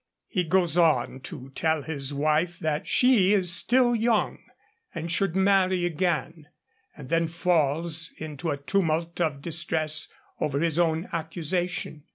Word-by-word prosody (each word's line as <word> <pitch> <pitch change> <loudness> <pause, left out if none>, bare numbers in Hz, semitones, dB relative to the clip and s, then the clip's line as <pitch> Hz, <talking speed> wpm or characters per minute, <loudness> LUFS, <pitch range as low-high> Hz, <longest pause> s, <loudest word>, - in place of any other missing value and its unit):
He 180 - -1
goes 175 0 +2
on 140 -6 +2
to 130 +1 -9
tell 160 -1 0
his 145 -3 -4
wife 155 +4 0
that 155 -1 -2
she 225 -7 +4
is 180 -3 +2
still 240 +5 +3
young, 225 -1 +1 0.6
and 165 0 -4
should 185 -1 0
marry 190 -2 +3
again; 165 -2 -2 0.5
and 145 -4 -9
then 165 0 +2
falls 165 -1 0
into 155 +1 -5
a 145 - -1
tumult 165 +2 -1
of 145 -4 -1
distress 160 -2 -1 0.3
over 140 -1 -1
his 165 0 +1
own 165 0 +1
accusation. 170 -1 -2
165 Hz, 140 wpm, -26 LUFS, 155-180 Hz, 0.6 s, she